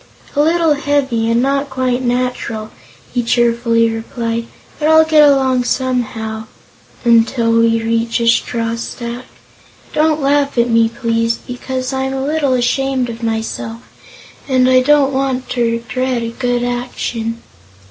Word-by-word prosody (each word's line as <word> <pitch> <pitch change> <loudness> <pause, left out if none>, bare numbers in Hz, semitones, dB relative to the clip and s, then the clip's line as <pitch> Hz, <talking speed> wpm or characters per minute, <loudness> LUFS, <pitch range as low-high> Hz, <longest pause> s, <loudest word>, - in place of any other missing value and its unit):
"A 290 - +3
little 325 0 +3
heavy, 280 -6 0
and 230 +2 +2
not 275 +1 0
quite 255 -1 -1
natural," 245 -3 -2 0.4
he 245 - +1
cheerfully 235 -1 +2
replied; 230 +1 -3 0.3
"but 305 - +1
I'll 315 0 +6
get 305 -2 +6
along 260 -2 +2
somehow 225 -4 -2 0.6
until 230 0 +3
we 230 0 +3
reach 230 +1 0
a 235 - 0
straw 230 0 +1
stack. 235 +1 -6 0.7
Don't 310 0 +2
laugh 280 -1 +1
at 235 0 +2
me, 230 0 +4
please, 230 -1 0
because 255 +2 -5
I'm 265 0 -2
a 265 0 -2
little 295 -2 +1
ashamed 255 0 0
of 230 +1 -9
myself 225 0 -3 0.6
and 255 -2 +3
I 255 0 +5
don't 280 0 +3
want 265 -1 -1
to 245 - -2
regret 245 +1 -2
a 230 - -3
good 245 0 -1
action." 240 -2 -3
245 Hz, 140 wpm, -16 LUFS, 230-270 Hz, 0.7 s, I'll